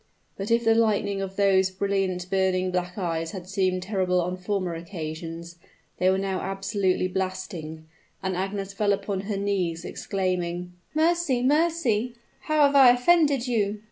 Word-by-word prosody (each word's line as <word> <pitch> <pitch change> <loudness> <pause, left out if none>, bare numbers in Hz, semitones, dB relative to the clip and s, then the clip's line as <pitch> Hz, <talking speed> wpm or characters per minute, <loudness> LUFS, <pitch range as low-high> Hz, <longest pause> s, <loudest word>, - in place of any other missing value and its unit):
But, 195 +2 -5
if 230 0 +2
the 225 - +5
lightning 210 -3 +1
of 195 0 -5
those 195 -2 +3
brilliant, 190 -2 -1
burning, 185 -1 +1
black 180 +1 -2
eyes 165 -3 -2
had 185 -2 -7
seemed 185 -2 0
terrible 185 -2 0
on 180 +1 -1
former 185 -1 -2
occasions, 165 0 -7 0.4
they 185 - +4
were 190 - +2
now 195 -1 -2
absolutely 195 -1 0
blasting, 185 -4 -4 0.4
and 190 -1 -1
Agnes 195 +1 -3
fell 205 0 +2
upon 195 -1 -2
her 205 - -1
knees, 185 -4 -1
exclaiming, 180 -2 -3 0.2
"Mercy! 320 -5 +2
mercy! 270 -6 +1 0.3
how 305 -1 +4
have 280 0 +2
I 270 -3 +9
offended 275 0 +3
you?" 210 -3 0
195 Hz, 150 wpm, -25 LUFS, 180-215 Hz, 0.4 s, I